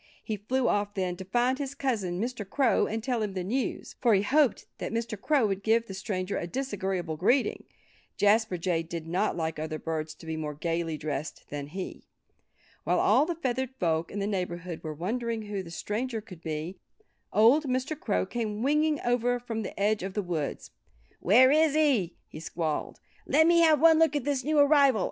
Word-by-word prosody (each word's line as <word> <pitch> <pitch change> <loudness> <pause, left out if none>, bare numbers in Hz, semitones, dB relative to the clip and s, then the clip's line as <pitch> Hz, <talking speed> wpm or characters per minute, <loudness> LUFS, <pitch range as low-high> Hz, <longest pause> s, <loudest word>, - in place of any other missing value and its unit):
He 220 - -3
flew 245 +6 -1
off 205 0 0
then, 185 -2 -1
to 190 - -7
find 245 +6 +1
his 280 -1 -4
cousin 210 -11 -1
Mr. 235 0 -3
Crow 245 +5 +2
and 220 0 -3
tell 245 -2 -1
him 210 -2 -2
the 185 - -2
news. 245 +7 -3
For 235 -4 +5
he 195 - +2
hoped 275 +2 +2
that - - -4
Mr. 230 -1 -2
Crow 270 +4 +2
would 195 -1 -1
give 225 +2 +2
the 195 - -8
stranger 190 -1 -3
a 170 - -4
disagreeable 190 - -3
greeting. 245 - +1 0.5
Jasper 210 -2 +3
Jay 170 -1 0
did 165 0 -6
not 175 +2 0
like 160 -2 -2
other 155 0 -3
birds 160 -1 -4
to - - -14
be 160 0 -3
more 150 -2 -4
gayly 165 0 -2
dressed 150 0 -5
than 145 -1 -4
he. 185 +5 -6 0.8
While - - +1
all 305 - +4
the 345 - -2
feathered 260 -3 -2
folk 165 -1 0
in - - -7
the 200 - -1
neighborhood 180 -4 -3
were 155 -1 -5
wondering 225 +6 -2
who 205 -2 -4
the 175 - -10
stranger 225 +7 -3
could 185 -6 -12
be 160 +3 -5 0.5
old 245 +9 +5
Mr. 260 +3 -1
Crow 90 - 0
came 220 -2 -3
winging 300 +1 +2
over 245 0 +1
from 230 -2 -4
the - - -7
edge 210 +1 +2
of 190 +1 -5
the 210 - 0
woods. 165 -5 -4 0.5
"Where 250 +8 +6
is 310 0 +4
he?" 265 - +2
he - - -10
squalled. 160 -1 -3 0.3
"Let 315 +2 +5
me 340 +1 +5
have 320 -3 +5
one 320 +1 +6
look 320 -3 +4
at 290 - 0
this 275 -1 -1
new 305 +3 0
arrival! 285 -4 +5
210 Hz, 200 wpm, -28 LUFS, 175-260 Hz, 0.8 s, Where